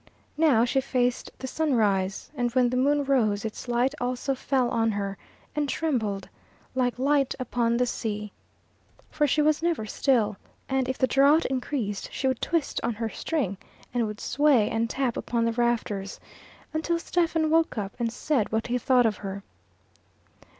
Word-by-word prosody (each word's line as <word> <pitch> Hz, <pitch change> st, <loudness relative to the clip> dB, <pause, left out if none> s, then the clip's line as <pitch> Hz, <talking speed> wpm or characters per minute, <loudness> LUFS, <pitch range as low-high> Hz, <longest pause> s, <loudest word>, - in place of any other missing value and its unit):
Now 270 Hz, -8 st, +5 dB
she 265 Hz, +2 st, +1 dB
faced 250 Hz, -2 st, 0 dB
the -, -, -7 dB
sunrise; 215 Hz, -10 st, 0 dB
and 245 Hz, -4 st, -1 dB
when 250 Hz, -1 st, +4 dB
the 250 Hz, -, -2 dB
moon 285 Hz, +3 st, +2 dB
rose 225 Hz, -7 st, +1 dB
its 220 Hz, +3 st, -6 dB
light 245 Hz, +3 st, +1 dB
also 250 Hz, +2 st, -1 dB
fell 260 Hz, -1 st, 0 dB
on 225 Hz, -1 st, +2 dB
her, 200 Hz, -1 st, -3 dB, 0.4 s
and 295 Hz, -1 st, 0 dB
trembled, 220 Hz, -13 st, -1 dB, 0.5 s
like 250 Hz, -2 st, 0 dB
light 275 Hz, +1 st, +2 dB
upon 235 Hz, -2 st, 0 dB
the 250 Hz, -, +2 dB
sea. 210 Hz, -3 st, -3 dB, 0.8 s
For 300 Hz, -1 st, +2 dB
she 300 Hz, +2 st, +2 dB
was 305 Hz, 0 st, +2 dB
never 335 Hz, -10 st, 0 dB
still, 215 Hz, -2 st, +1 dB, 0.3 s
and 265 Hz, -1 st, 0 dB
if 260 Hz, -, -2 dB
the -, -, +3 dB
draught 280 Hz, +5 st, +4 dB
increased 250 Hz, -6 st, -2 dB
she -, -, -4 dB
would 260 Hz, -, 0 dB
twist 330 Hz, -3 st, 0 dB
on 235 Hz, -, -1 dB
her 225 Hz, +1 st, -2 dB
string, 225 Hz, -, -2 dB, 0.4 s
and 240 Hz, -2 st, +1 dB
would 210 Hz, 0 st, -6 dB
sway 280 Hz, -7 st, +3 dB
and 225 Hz, 0 st, 0 dB
tap 260 Hz, -2 st, -1 dB
upon 235 Hz, -1 st, -1 dB
the 230 Hz, -, +1 dB
rafters 225 Hz, -5 st, -1 dB, 0.5 s
until 320 Hz, +2 st, 0 dB
Stephen 330 Hz, -2 st, 0 dB
woke 325 Hz, -5 st, +2 dB
up 200 Hz, -2 st, -3 dB
and 230 Hz, -1 st, 0 dB
said 250 Hz, -3 st, 0 dB
what 220 Hz, 0 st, 0 dB
he 245 Hz, +1 st, 0 dB
thought 250 Hz, 0 st, +4 dB
of 220 Hz, -2 st, +1 dB
her. 200 Hz, 0 st, -6 dB
245 Hz, 170 wpm, -26 LUFS, 225-280 Hz, 0.8 s, Now